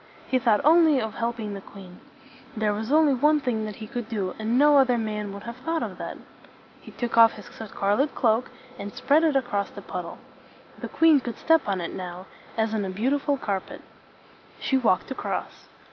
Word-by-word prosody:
He 260 Hz, -, +1 dB
thought 225 Hz, -2 st, +2 dB
only 315 Hz, -2 st, +6 dB
of 220 Hz, -2 st, -3 dB
helping 230 Hz, -3 st, -3 dB
the 195 Hz, -, -7 dB
queen. 190 Hz, -2 st, -13 dB, 0.6 s
There 215 Hz, -1 st, +1 dB
was 220 Hz, +4 st, -4 dB
only 305 Hz, -2 st, +5 dB
one 300 Hz, +4 st, +3 dB
thing 235 Hz, -6 st, -2 dB
that 210 Hz, -1 st, -6 dB
he 220 Hz, -, -8 dB
could 240 Hz, -1 st, -6 dB
do, 200 Hz, -5 st, -2 dB
and 220 Hz, +3 st, 0 dB
no 290 Hz, +1 st, +6 dB
other 255 Hz, -2 st, +3 dB
man 210 Hz, -2 st, -3 dB
would 200 Hz, 0 st, -9 dB
have 235 Hz, +1 st, -7 dB
thought 325 Hz, +5 st, -2 dB
of -, -, -6 dB
that. -, -, -6 dB, 0.6 s
He -, -, -13 dB
took 235 Hz, -1 st, -1 dB
off 230 Hz, 0 st, +8 dB
his 210 Hz, -, -11 dB
scarlet 220 Hz, +5 st, -1 dB
cloak, 230 Hz, 0 st, +1 dB, 0.3 s
and 200 Hz, +1 st, -6 dB
spread 290 Hz, +4 st, +3 dB
it 310 Hz, -3 st, +2 dB
across 240 Hz, -7 st, 0 dB
the -, -, -11 dB
puddle. -, -, -6 dB, 0.6 s
The -, -, -5 dB
queen 320 Hz, -3 st, +5 dB
could 240 Hz, -3 st, -6 dB
step 325 Hz, -6 st, +2 dB
on 195 Hz, -2 st, 0 dB
it 170 Hz, -, -5 dB
now, 180 Hz, 0 st, -7 dB, 0.3 s
as 220 Hz, 0 st, 0 dB
on 215 Hz, -2 st, 0 dB
a 190 Hz, -, -3 dB
beautiful 275 Hz, +8 st, 0 dB
carpet. 200 Hz, -7 st, -4 dB, 0.8 s
She 270 Hz, -, 0 dB
walked 235 Hz, -4 st, +1 dB
across. 265 Hz, -, -5 dB
230 Hz, 195 wpm, -25 LUFS, 210-275 Hz, 0.8 s, off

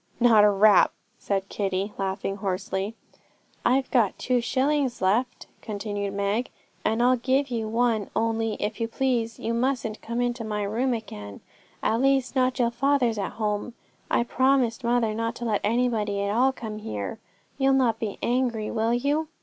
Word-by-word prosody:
'Not 230 Hz, -3 st, +6 dB
a 210 Hz, -, +7 dB
rap,' 205 Hz, 0 st, +5 dB, 0.3 s
said 195 Hz, -1 st, -2 dB
Kitty, 195 Hz, 0 st, -2 dB
laughing 195 Hz, 0 st, -3 dB
hoarsely. 195 Hz, +2 st, -3 dB, 0.7 s
'I've 260 Hz, +2 st, +2 dB
got 230 Hz, -7 st, +2 dB
two 250 Hz, -1 st, +1 dB
shillings 265 Hz, +1 st, 0 dB
left,' 225 Hz, +7 st, 0 dB, 0.2 s
continued 205 Hz, -2 st, -4 dB
Meg, 200 Hz, +5 st, 0 dB, 0.3 s
'and 225 Hz, +2 st, +1 dB
I'll 250 Hz, +1 st, +4 dB
give 265 Hz, +3 st, 0 dB
you 225 Hz, -2 st, -2 dB
one; 225 Hz, -2 st, +1 dB
only, 225 Hz, -1 st, 0 dB
if 210 Hz, +2 st, -4 dB
you 230 Hz, -, +1 dB
please, 235 Hz, -2 st, -1 dB
you 230 Hz, -, -2 dB
mustn't 235 Hz, -3 st, -1 dB
come 235 Hz, +1 st, -4 dB
into 245 Hz, -1 st, -1 dB
my 210 Hz, -1 st, -2 dB
room 235 Hz, +5 st, 0 dB
again, 105 Hz, -, -8 dB, 0.4 s
at 225 Hz, +2 st, +1 dB
least 270 Hz, -1 st, +2 dB, 0.2 s
till 240 Hz, -3 st, +1 dB
father's 245 Hz, -3 st, +1 dB
at 195 Hz, -, -3 dB
home. 215 Hz, +1 st, -2 dB, 0.3 s
I -, -, +2 dB
promised 260 Hz, -1 st, +1 dB
mother 235 Hz, -2 st, +1 dB
not 230 Hz, +1 st, -2 dB
to 240 Hz, -, -6 dB
let 215 Hz, -3 st, 0 dB
anybody 215 Hz, -3 st, 0 dB
at 200 Hz, +1 st, -1 dB
all 260 Hz, +3 st, +4 dB
come 220 Hz, -4 st, -7 dB
here. 105 Hz, -, -5 dB, 0.4 s
You'll 270 Hz, 0 st, +4 dB
not 245 Hz, -5 st, +2 dB
be 215 Hz, -3 st, -3 dB
angry, 240 Hz, -3 st, 0 dB
will 225 Hz, +1 st, +1 dB
you?' 290 Hz, +5 st, 0 dB
230 Hz, 165 wpm, -26 LUFS, 210-250 Hz, 0.7 s, a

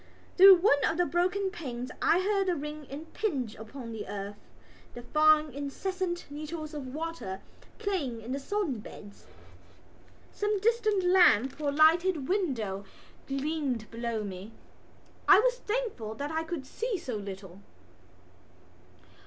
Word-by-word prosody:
Through 385 Hz, +1 st, +10 dB
one 345 Hz, -6 st, +3 dB
of 325 Hz, -, +1 dB
the 355 Hz, -, +3 dB
broken 370 Hz, +3 st, 0 dB
panes 255 Hz, -, -6 dB
I 350 Hz, -, +4 dB
heard 395 Hz, 0 st, +1 dB
the 360 Hz, -, +2 dB
rain 300 Hz, 0 st, -6 dB
impinge 290 Hz, -, -3 dB
upon 230 Hz, +2 st, -9 dB
the 220 Hz, -2 st, -6 dB
earth, 205 Hz, 0 st, -6 dB, 0.6 s
the 240 Hz, -, -8 dB
fine 305 Hz, +3 st, +4 dB
incessant 345 Hz, +6 st, -3 dB
needles 310 Hz, +1 st, -6 dB
of 270 Hz, -4 st, -6 dB
water 320 Hz, -12 st, -4 dB, 0.4 s
playing 355 Hz, -, -2 dB
in 225 Hz, +3 st, -8 dB
the 275 Hz, -, -2 dB
sodden 310 Hz, -, -2 dB
beds. 205 Hz, 0 st, -12 dB, 1.0 s
Some 415 Hz, 0 st, -1 dB
distant 430 Hz, -2 st, +2 dB
lamp 330 Hz, -, +4 dB
or 290 Hz, -1 st, +1 dB
lighted 315 Hz, 0 st, +4 dB
window 240 Hz, -, -1 dB, 0.4 s
gleamed 275 Hz, -4 st, -2 dB
below 230 Hz, -1 st, -3 dB
me. 195 Hz, +2 st, -7 dB, 0.7 s
I 390 Hz, -1 st, +9 dB
was -, -, +2 dB
thankful 420 Hz, -, -3 dB
that 285 Hz, +4 st, -4 dB
I 320 Hz, +1 st, -1 dB
could 315 Hz, -5 st, -5 dB
see 455 Hz, -, -3 dB
so 260 Hz, -9 st, -5 dB
little. 195 Hz, -2 st, -8 dB
305 Hz, 135 wpm, -29 LUFS, 240-370 Hz, 1.0 s, Through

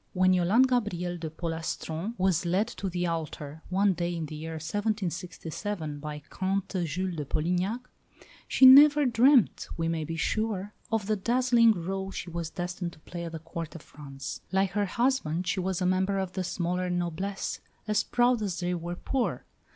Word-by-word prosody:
When 185 Hz, -1 st, +4 dB
Yolande 185 Hz, +8 st, +4 dB
Gabrielle 210 Hz, -9 st, -1 dB
de 160 Hz, -1 st, -4 dB
Polastron 165 Hz, +4 st, -4 dB
was 185 Hz, -3 st, +2 dB
led 185 Hz, +5 st, +1 dB
to 200 Hz, -5 st, -4 dB
the 180 Hz, 0 st, -1 dB
altar, 160 Hz, -2 st, -4 dB
one 195 Hz, +1 st, +3 dB
day 175 Hz, 0 st, -2 dB
in 165 Hz, -2 st, -3 dB
the 155 Hz, -, -8 dB
year 160 Hz, +2 st, -6 dB
1767, 175 Hz, -2 st, -3 dB
by 150 Hz, 0 st, -6 dB
Comte 190 Hz, -1 st, -2 dB
Jules 180 Hz, +3 st, -3 dB
de 150 Hz, -, -2 dB
Polignac, 180 Hz, -, -1 dB, 0.7 s
she 265 Hz, -, +5 dB
never 290 Hz, +2 st, +9 dB
dreamt, 250 Hz, 0 st, +4 dB
we 165 Hz, -1 st, 0 dB
may 165 Hz, -1 st, -1 dB
be 165 Hz, +2 st, -4 dB
sure, 205 Hz, +3 st, -1 dB, 0.2 s
of 225 Hz, -3 st, 0 dB
the 215 Hz, +1 st, +1 dB
dazzling 235 Hz, +1 st, +4 dB
rôle 190 Hz, +2 st, -3 dB
she 175 Hz, -, -6 dB
was 170 Hz, -1 st, -3 dB
destined 175 Hz, 0 st, -4 dB
to -, -, -17 dB
play 170 Hz, +1 st, -6 dB
at 165 Hz, -, -5 dB
the 165 Hz, -, -5 dB
Court 165 Hz, +1 st, -7 dB
of 165 Hz, -, -9 dB
France. 135 Hz, -2 st, -8 dB
Like 190 Hz, 0 st, +2 dB
her 205 Hz, +1 st, +1 dB
husband, 195 Hz, -, 0 dB
she 190 Hz, -, 0 dB
was 185 Hz, 0 st, -1 dB
a -, -, +1 dB
member 190 Hz, +2 st, +1 dB
of 190 Hz, -2 st, -2 dB
the 185 Hz, -, -2 dB
smaller 180 Hz, +1 st, -1 dB
noblesse, 175 Hz, +3 st, -2 dB, 0.3 s
as 210 Hz, 0 st, +2 dB
proud 245 Hz, -1 st, +2 dB
as 190 Hz, -4 st, -2 dB
they 180 Hz, 0 st, -1 dB
were 175 Hz, 0 st, -4 dB
poor. 255 Hz, +7 st, -2 dB
180 Hz, 180 wpm, -28 LUFS, 165-205 Hz, 0.7 s, never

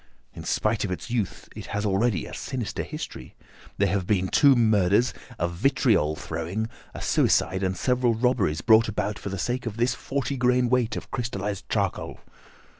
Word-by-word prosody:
In -, -, -9 dB
spite 110 Hz, 0 st, 0 dB
of 100 Hz, -, -2 dB
its 105 Hz, +7 st, -5 dB
youth, 115 Hz, -6 st, -2 dB
it -, -, -8 dB
has 100 Hz, +1 st, -2 dB
already 100 Hz, -2 st, +1 dB
a -, -, -9 dB
sinister 125 Hz, -5 st, -4 dB
history. -, -, -7 dB, 0.4 s
There 100 Hz, -, +3 dB
have 95 Hz, -1 st, -1 dB
been 95 Hz, -3 st, +1 dB
two 140 Hz, +4 st, +6 dB
murders, 110 Hz, 0 st, +3 dB, 0.2 s
a 85 Hz, -, 0 dB
vitriol 100 Hz, -, +2 dB
throwing, 95 Hz, +9 st, -4 dB, 0.3 s
a -, -, -6 dB
suicide, 95 Hz, +1 st, +2 dB
and 95 Hz, -1 st, -1 dB
several 125 Hz, 0 st, +2 dB
robberies 110 Hz, -10 st, +1 dB
brought 115 Hz, 0 st, +5 dB
about 105 Hz, -1 st, -2 dB
for -, -, -5 dB
the 95 Hz, -, -4 dB
sake 125 Hz, +6 st, -2 dB
of 110 Hz, -1 st, -5 dB
this 120 Hz, +1 st, +2 dB
forty 135 Hz, +2 st, -3 dB
grain 125 Hz, 0 st, +2 dB
weight 125 Hz, -2 st, +1 dB
of -, -, -7 dB
crystallised 105 Hz, -6 st, -3 dB
charcoal. -, -, -2 dB
110 Hz, 175 wpm, -25 LUFS, 95-125 Hz, 0.4 s, two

